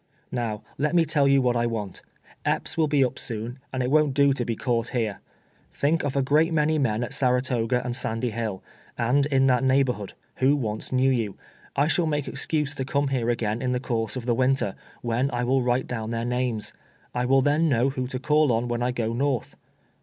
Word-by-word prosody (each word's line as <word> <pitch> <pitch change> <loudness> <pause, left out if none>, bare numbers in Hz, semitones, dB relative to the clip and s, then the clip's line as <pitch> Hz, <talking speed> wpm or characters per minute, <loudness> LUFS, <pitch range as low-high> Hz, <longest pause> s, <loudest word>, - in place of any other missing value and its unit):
Xow 110 -3 -2 0.2
let 150 +4 +1
me 170 -1 +5
tell 145 -2 +2
you 135 -1 +4
what 125 -1 +2
I 120 0 +1
want. 105 -5 -4 0.4
Epps - - -1
will 160 -2 +2
be 145 -2 +3
up 130 - -4
soon, 115 +3 -5
and 130 -1 -1
it 125 - -1
won't 150 -3 +3
do 140 -1 +4
to 125 - -2
be 115 -1 -2
cauii'lit 120 0 -1
here. 110 -4 -1 0.5
Think 155 +3 +1
of 145 -1 -2
a 140 - +2
<;reat 155 +5 +3
many 155 0 +2
men 115 -4 0
at 120 - -5
Sarato 125 -3 +1
ga 125 +1 +1
and 120 -1 -3
Sandy 115 -1 -2
Hill, 110 -4 -4 0.3
and 130 +4 +2
in 135 -2 +3
that 130 0 +3
neighborhood, 130 -6 +1 0.2
who 135 +3 +4
once 110 -6 -3
knew 130 +1 +3
you. 115 -6 -1 0.4
I 140 +2 +3
shall 165 +2 +1
make 145 -2 -1
exense 150 -3 -1
to 135 - -3
come 140 +1 0
here 125 -3 0
again 115 -1 -1
in 125 -1 0
the 125 - 0
course 115 -3 -2
of 125 -2 -5
the 120 - +2
winter, 130 -4 +2 0.3
when 120 +3 0
I 125 -2 -2
will 130 +2 +2
write 125 +1 +1
down 115 -3 -4
their 115 0 -2
names. 125 -3 -1 0.4
I 125 0 0
will 135 +1 +4
then 150 +3 +3
know 130 0 +2
Mdio 130 -2 -3
to 130 - -4
call 150 +1 +3
on 115 +1 0
when 120 0 -2
I 125 - +1
go 115 -2 -2
north. 135 0 -1
125 Hz, 220 wpm, -25 LUFS, 115-140 Hz, 0.5 s, me